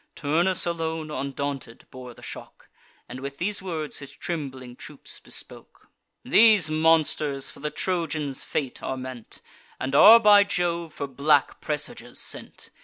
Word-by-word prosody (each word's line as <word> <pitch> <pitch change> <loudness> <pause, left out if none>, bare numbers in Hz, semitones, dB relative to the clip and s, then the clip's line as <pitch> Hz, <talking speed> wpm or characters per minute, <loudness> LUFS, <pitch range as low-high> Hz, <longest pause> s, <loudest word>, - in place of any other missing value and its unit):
Turnus 170 +5 +1
alone, 160 -2 -3
undaunted, 140 -3 -5
bore 125 -2 -10
the - - -16
shock, - - -10 0.4
And 125 - -8
with 140 +1 -7
these 200 +5 -2
words 160 -5 -4
his 140 - -9
trembling 130 -7 -6
troops 150 +2 -9
bespoke: - - -10 0.3
"These 210 -8 +5
monsters 155 -3 +1
for - - -15
the 150 - -3
Trojans' 160 -6 -2
fate 135 -5 -4
are 130 - -3
meant, 130 -3 -9 0.4
And 130 +1 -3
are 215 +11 +9
by 205 -2 +7
Jove 170 -4 -2
for 140 - -3
black 140 +1 +1
presages 150 -1 -4
sent. - - -8
150 Hz, 140 wpm, -25 LUFS, 135-170 Hz, 0.4 s, are